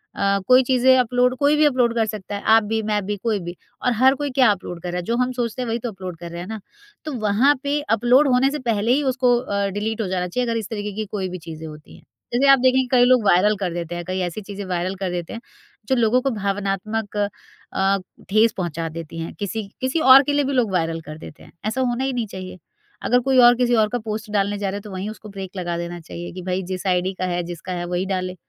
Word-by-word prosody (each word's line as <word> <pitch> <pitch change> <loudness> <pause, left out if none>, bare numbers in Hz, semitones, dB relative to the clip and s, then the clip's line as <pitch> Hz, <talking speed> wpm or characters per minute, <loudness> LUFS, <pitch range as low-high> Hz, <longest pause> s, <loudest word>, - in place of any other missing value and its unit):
अ, 200 0 +1
कोई 255 +1 +6
चीज़ें 260 0 +4
अपलोड 250 +1 +2
कोई 290 +1 +3
भी 305 - +5
अपलोड 250 -5 +2
कर 225 -1 +2
सकता 210 -2 -6
है, 200 - -5
आप 225 0 +5
भी 220 +1 -1
मैं 210 -1 0
भी 205 +1 -2
कोई 210 +1 -1
भी। 175 -1 -7 0.3
और 250 - +1
हर 260 +4 +5
कोई 290 - -1
क्या 255 -3 +4
अपलोड 175 -3 -5
कर 180 - -3
रहा 180 - -3
है 180 - -3
जो 230 - 0
हम 250 +1 +1
सोचते 245 -1 -3
हैं 245 - -3
वही 230 +1 -1
तो 240 0 -4
अपलोड 185 -3 -8
कर 170 0 -8
रहे 170 0 -6
हैं 180 - -7
ना। 220 -1 -5 0.5
तो 305 - -4
वहाँ 225 +8 +4
पे 285 +1 0 0.2
अपलोड 250 +6 +4
होने 260 +1 +3
से 300 - -3
पहले 230 -2 0
ही 285 +4 +3
उसको 255 -2 +2
अ, 200 -5 -1
डिलीट 215 +3 -3
हो 210 - -2
जाना 180 -1 -1
चाहिए 245 +7 -2
अगर 230 - 0
इस 215 - -7
तरीके 210 -2 -4
की 215 0 -3
कोई 190 -3 -2
भी 185 - -5
चीज़ें 160 0 -7
होती 150 0 -12
हैं। - - -20 0.3
जैसे 265 +3 +3
आप 275 - +6
देखेंगे 260 0 +3
कई 250 -2 +5
लोग 250 -3 +4
वायरल 200 +3 +4
कर 180 -3 -2
देते 175 0 -4
हैं 175 - -4
कई 185 +1 -3
ऐसी 175 +4 -3
चीज़ें 200 0 -7
वायरल 185 +1 -2
कर 190 -1 -3
देते 175 -2 -4
हैं 230 - -7 0.5
जो 265 - +2
लोगों 240 +1 +3
को 270 - 0
भावनात्मक 205 +1 -2
अ, 195 -1 -2 0.3
ठेस 215 +3 +4
पहुँचा 165 -3 -3
देती 165 0 -8
हैं 165 - -5
किसी 215 +2 -3 0.2
किसी 260 +5 0
और 270 -1 +8
के 290 - -1
लिए 290 0 +2
भी 280 +1 -2
लोग 240 -6 +1
वायरल 165 -2 -1
कर 155 +1 -8
देते 160 - -12
हैं। - - -16
ऐसा 220 +5 -1
होना 250 0 0
ही 270 0 -1
नहीं 240 -3 -2
चाहिए 185 -2 -8 0.5
अगर 245 - +3
कोई 265 -1 +3
और 245 0 +8
किसी 245 0 +2
और 215 - +3
का 245 - -1
पोस्ट 215 +1 -4
डालने 205 0 0
जा 200 -1 -2
रहा 195 - -4
है - - -7
तो 210 - -10
वहीं 190 +2 -4
उसको 215 0 -10
ब्रेक 195 -2 -7
लगा 175 -2 -2
देना 170 0 -5
चाहिए 170 +1 -8
कि 185 - -7
भई 185 +1 -1
जिस 185 +2 -4
आईडी 185 +1 +1
का 185 - 0
है 175 -1 -1
जिसका 175 +1 -7
है 175 0 -3
वही 180 +1 -2
डाले। 185 -1 -3
210 Hz, 270 wpm, -22 LUFS, 185-245 Hz, 0.5 s, और